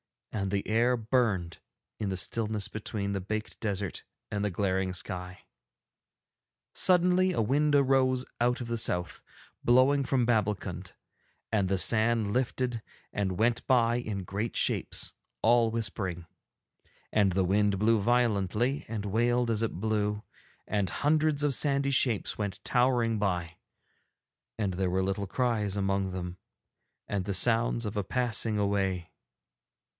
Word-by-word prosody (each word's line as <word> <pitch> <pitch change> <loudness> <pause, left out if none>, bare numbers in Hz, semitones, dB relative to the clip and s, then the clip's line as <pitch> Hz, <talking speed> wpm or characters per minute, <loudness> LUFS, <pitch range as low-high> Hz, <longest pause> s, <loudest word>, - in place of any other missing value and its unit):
And 100 -3 -2
the 100 0 -2
air 120 +3 +2
burned 110 -7 0 0.4
in 105 - -2
the 95 - -2
stillness 105 +1 -1
between 105 -2 -4
the 100 -1 -2
baked 110 +3 -5
desert 100 -4 -3 0.3
and 105 -1 -2
the 105 - +1
glaring 95 0 -1
sky. 90 0 -4 1.3
Suddenly 180 0 +3
a 115 - 0
wind 145 +6 +2
arose 130 -2 +3
out 125 +1 +1
of 120 - -5
the 115 0 0
South, 90 -5 -1 0.4
blowing 130 +3 +4
from 130 -2 +1
Babbulkund, 105 -4 -1 0.6
and 100 -4 +1
the 95 - +1
sand 110 +3 +3
lifted 125 -2 -1 0.3
and 95 -3 -2
went 115 +3 +1
by 120 -2 +3
in 105 -5 -4
great 100 +5 -4
shapes, - - 0 0.3
all 115 0 +4
whispering. 100 -6 -3 0.9
And 100 -3 +3
the 95 +1 +2
wind 100 +1 +2
blew 110 +2 +3
violently, 120 +2 +1
and 105 -2 -4
wailed 120 +3 +1
as 110 -1 0
it 115 - -1
blew, 105 +1 -1 0.4
and 100 -3 -1
hundreds 150 - +1
of 145 -2 +2
sandy 140 0 +2
shapes 120 -7 +2
went 100 -3 -4
towering 120 -3 +2
by, 90 -4 -2 1.0
and 95 -3 -1
there 95 0 0
were 95 +1 0
little 95 +1 -2
cries 105 -3 -1
among 95 -1 0
them 90 -1 -5 0.7
and 100 -3 -2
the 100 - -2
sounds 115 +3 +3
of 105 +1 -4
a 105 - 0
passing 115 -1 0
away. 95 -4 -1
110 Hz, 140 wpm, -29 LUFS, 100-120 Hz, 1.3 s, blowing